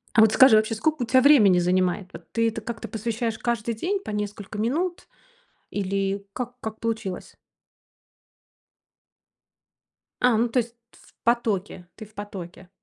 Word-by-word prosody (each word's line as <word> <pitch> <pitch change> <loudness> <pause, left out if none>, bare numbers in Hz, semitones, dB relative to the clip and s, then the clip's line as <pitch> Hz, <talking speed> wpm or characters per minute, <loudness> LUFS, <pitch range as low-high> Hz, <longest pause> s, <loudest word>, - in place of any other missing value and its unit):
А 220 - +7
вот 220 0 +6
скажи, 260 -4 +7
вообще 215 +1 +2
сколько 300 +5 0
у - - -1
тебя 255 +3 +4
времени 225 -11 +6
занимает? 180 +1 +1
Вот 165 0 -12
ты 230 0 +2
этому 225 -1 -6
как-то 235 -2 -5
посвящаешь 225 +1 -3
каждый 235 -1 -2
день 370 - -1
по - - -6
несколько 210 0 -5
минут? 325 - -2 0.6
Или 195 0 -2
как 245 +1 -6
как 220 0 -6
получилось? 220 -5 -4 2.9
А, 250 -2 +5
ну, 235 +2 +2
то 245 +2 +2
есть 235 +1 -8
тф - - -21
в - - -23
потоке. 210 -6 0
Ты 220 - -9
в 215 - -24
потоке. 190 -3 -8
220 Hz, 155 wpm, -25 LUFS, 200-235 Hz, 2.9 s, А